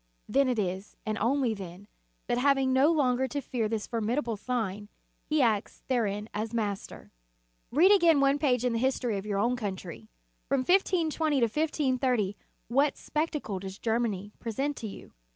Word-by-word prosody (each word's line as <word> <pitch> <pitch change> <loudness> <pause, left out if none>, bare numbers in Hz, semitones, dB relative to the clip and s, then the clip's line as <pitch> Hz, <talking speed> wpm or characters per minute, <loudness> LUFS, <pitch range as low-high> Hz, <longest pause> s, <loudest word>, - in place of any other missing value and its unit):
Then 270 +4 +3
it 250 - 0
is, 190 0 -3
and 215 -1 -1
only 250 +1 +1
then, 190 -1 -9 0.4
that 240 - 0
having 270 -1 +3
no 275 +5 +5
longer 265 -4 +2
to 285 +3 -3
fear 240 -5 -2
this 220 -1 -2
formidable 230 +1 -1
sign, 210 -3 -3 0.4
he 305 -2 +2
acts 215 -4 0
therein 215 -5 0
as 220 +2 -3
master. 205 -3 -4 0.6
Read 340 +9 +5
again 340 -7 +5
one 275 +1 +3
page 250 -5 +2
in 245 - +1
the 230 - 0
history 245 -4 0
of 200 - -8
your 205 -2 -1
own 235 +5 +2
country. 185 - -6 0.4
From 275 0 +2
1520 320 -4 +2
to - - +4
1530, 255 -5 +1 0.3
what 275 +5 +2
spectacle 300 - -2
does 190 0 -7
Germany 220 -4 -1
present 270 +6 -2
to 225 - -5
you? 200 - -10
240 Hz, 165 wpm, -29 LUFS, 210-275 Hz, 0.6 s, no